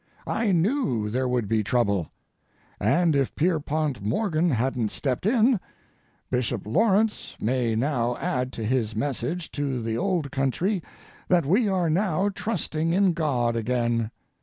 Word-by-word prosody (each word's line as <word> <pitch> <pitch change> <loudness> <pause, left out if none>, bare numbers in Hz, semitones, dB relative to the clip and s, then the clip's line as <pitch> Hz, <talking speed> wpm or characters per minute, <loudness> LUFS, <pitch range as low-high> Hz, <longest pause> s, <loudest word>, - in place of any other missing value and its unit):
I 225 -3 0
knew 165 - +1
there 130 +2 0
would 125 -4 0
be 110 0 +1
trouble. 100 - +1 0.7
And 170 -3 +3
if 135 -2 0
Pierpont 155 - 0
Morgan 160 - +1
hadn't 125 -3 0
stepped 135 - -2
in—Bishop 205 - -1
Lawrence 210 - +1
may 120 0 0
now 120 -1 0
add 125 0 -1
to 115 - -4
his 115 -2 0
message 145 +7 -2
to 140 -3 -2
the 115 -1 -2
old 180 -7 0
country 170 - 0 0.5
that 175 -4 +3
we 205 - +3
are 185 -3 +1
now 185 +3 +1
trusting 165 -6 -2
in 190 -1 +3
God 130 -8 0
again. 115 -1 0
140 Hz, 135 wpm, -25 LUFS, 120-180 Hz, 0.7 s, And